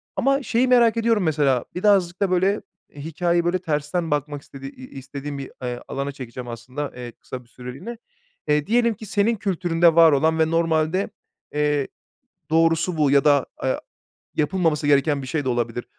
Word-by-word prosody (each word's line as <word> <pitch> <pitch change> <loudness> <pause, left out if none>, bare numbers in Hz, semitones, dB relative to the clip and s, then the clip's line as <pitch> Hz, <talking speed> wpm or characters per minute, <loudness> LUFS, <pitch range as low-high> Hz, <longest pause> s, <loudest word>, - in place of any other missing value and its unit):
ama 275 +1 +1
şeyi 245 +1 +1
merak 235 -2 +4
ediyorum 230 -3 +2
mesela, 145 -6 +1
birazcık 185 -2 +2
da, 195 -2 +2
böyle, 190 +3 +2 0.3
hikâyeyi, 170 +3 -1
böyle, 180 +1 +1
tersten 160 0 -2
bakmak 145 0 -2
istediği 135 -1 -10
i - - -24 0.2
i - - -7
istediğim 140 +2 -7
bir, 135 - -7
eee, 125 -1 -3
alana 140 +1 -3
çekeceğim 125 -2 -8
aslında, 125 +5 -6
eee, 125 -1 -7
kısa 125 +2 -9
bir - - -27
süreliğine. 135 - -8 0.5
Eee, 150 0 +1
diyelim 235 +1 +3
ki 220 +1 -11
senin 210 +3 +1
kültüründe 175 -4 +2
var 165 -1 +7
olan 160 +3 +2
ve 160 0 +2
normalde, 165 +2 +1 0.4
eee, 150 -2 +1 0.6
doğrusu 165 +2 +2
bu 150 -3 +3
ya 140 -1 +5
da, 145 -2 +4
aya 130 - -1 0.5
yapılmaması 160 -1 0
gereken 145 0 +3
bir - - -7
şey 145 +2 -2
de - - -1
olabilir. 120 -1 -1
155 Hz, 175 wpm, -23 LUFS, 140-180 Hz, 0.6 s, var